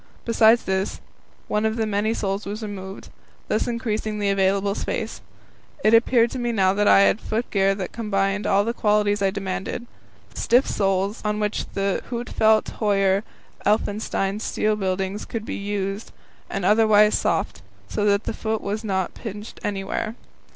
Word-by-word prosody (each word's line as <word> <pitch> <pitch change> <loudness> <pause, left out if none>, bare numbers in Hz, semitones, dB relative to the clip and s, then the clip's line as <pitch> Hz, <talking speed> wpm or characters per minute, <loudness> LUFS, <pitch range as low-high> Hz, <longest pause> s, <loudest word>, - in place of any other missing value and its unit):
Besides 230 0 +5
this, 190 +1 -1 0.5
one 210 - 0
of 220 0 +1
the 225 -1 0
many 215 +2 0
soles 195 -1 -2
was 210 +2 -5
removed, 195 -2 -7 0.4
thus 215 - +1
increasing 220 -3 -2
the 205 -1 +1
available 195 +1 +2
space. - - -4 0.6
It 215 - +4
appeared 230 0 +4
to 260 - -4
me 240 -1 -1
that 190 -3 +3
now - - +6
I - - +7
had 200 - +3
foot 225 +3 -3
gear 195 -1 +3
that 190 -2 -5
combined 200 -2 -1
all 200 +1 +3
the 230 - -1
qualities 210 -2 +2
I 195 - +3
demanded 195 +3 -4 0.5
stiff 245 +4 +3
soles, 195 +1 0
on 210 0 -1
which 210 0 -1
Huitfeldt 220 +2 0
Höyer 195 -2 +2 0.4
Ellefsen 210 0 +1 0.4
ski - - -1
bindings 195 0 -2
could 225 -2 -5
be - - -4
used, 200 +1 -3 0.4
and 195 -3 -3
otherwise 210 0 +5
soft, 165 -10 -1 0.3
so 205 - -2
that 200 0 +3
the - - -3
foot 220 0 -2
was 210 +2 -3
not 190 -4 -1
pinched 210 -1 -8
anywhere. 205 +2 -3
205 Hz, 160 wpm, -23 LUFS, 195-220 Hz, 0.6 s, I